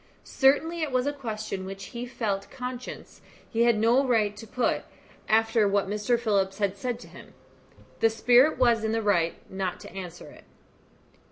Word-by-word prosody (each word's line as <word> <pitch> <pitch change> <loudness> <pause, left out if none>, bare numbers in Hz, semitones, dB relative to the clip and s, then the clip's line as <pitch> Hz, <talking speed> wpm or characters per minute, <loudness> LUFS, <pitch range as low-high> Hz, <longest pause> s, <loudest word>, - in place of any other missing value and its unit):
Certainly 315 +5 +2
it 310 -3 -1
was 255 0 +1
a 290 - 0
question 215 -7 -5
which 195 +1 -7
he 240 +1 -5
felt 205 -6 -3
conscious 250 -1 -7 0.3
he 230 +1 +1
had 235 -2 +4
no 235 +5 +4
right 220 -5 +1
to 220 +2 -10
put, 245 +3 0 0.5
after 225 0 +3
what 200 0 +1
Mr. 210 +4 0
Phillips 195 -4 0
had 200 -2 0
said 240 +3 -3
to - - -12
him. - - -14 0.6
The 225 - +4
spirit 245 +6 +4
was 235 -3 +3
in 220 0 0
the 225 0 0
right 175 -5 +2 0.2
not 190 -1 -3
to - - -10
answer 180 -3 -8
it. - - -16
225 Hz, 175 wpm, -27 LUFS, 200-250 Hz, 0.6 s, had